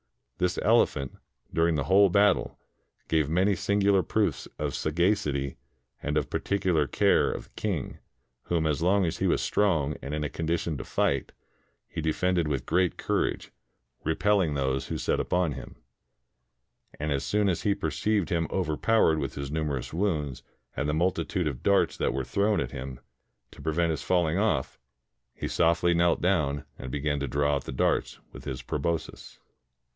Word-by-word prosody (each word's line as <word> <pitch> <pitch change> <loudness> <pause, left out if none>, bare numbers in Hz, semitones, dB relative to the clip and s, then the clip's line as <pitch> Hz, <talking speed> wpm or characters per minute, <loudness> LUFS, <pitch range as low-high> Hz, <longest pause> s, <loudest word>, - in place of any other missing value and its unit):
This 90 0 +1
elephant, 90 - +2 0.4
during 85 0 +2
the 70 - 0
whole 100 +3 +5
battle, 100 +1 +2 0.5
gave 80 -3 +1
many 95 +5 +3
singular 100 +1 +2
proofs 105 +3 -1
of 75 -2 -2
sagacity 75 -5 0 0.4
and 75 +1 -1
of 75 - -1
particular 90 -7 +1
care - - +3
of - - -5
the - - -22
king, 95 - -3 0.5
whom 85 -2 0
as 75 -1 0
long 95 +2 +3
as 80 - -3
he - - +1
was - - +2
strong 80 -8 +1
and 70 +2 -4
in 75 - -2
a 75 - -2
condition 85 0 -2
to - - -4
fight, 70 -1 0 0.6
he - - -5
defended 85 +2 +1
with 70 -5 -2
great 90 +1 +1
courage, - - -1 0.5
re 80 +1 0
pelling 95 -7 +2
those 65 -1 -1
who - - -3
set - - 0
upon 90 -3 +1
him; - - -8 1.2
and 75 +1 -2
as 70 -1 0
soon 105 0 +1
as 90 -4 0
he 100 -1 +1
per 80 -6 -2
ceived 100 +2 0
him 85 -2 0
overpowered 85 0 +2
with 70 -3 -4
his 70 0 -5
numerous 75 -4 -2
wounds 80 -8 -1 0.3
and 75 - -1
the - - +1
multitude 90 +1 0
of 70 -5 -4
darts 100 0 +3
that - - -1
were 70 - -1
thrown 100 - +1
at - - -3
him, 65 -1 -6 0.5
to - - -13
pre 80 - -1
vent 85 +1 +2
his 80 - -3
falling 85 -1 +1
off, 110 +1 0 0.6
he - - -4
softly 85 +1 +2
knelt 85 0 +3
down 75 -7 +1
and 65 - -6
began 75 +1 -1
to 70 - -2
draw 70 +3 +1
out - - -7
the - - -5
darts 65 - 0 0.2
with - - -11
his 65 0 -5
proboscis. 85 -2 -3
80 Hz, 175 wpm, -27 LUFS, 75-95 Hz, 1.2 s, whole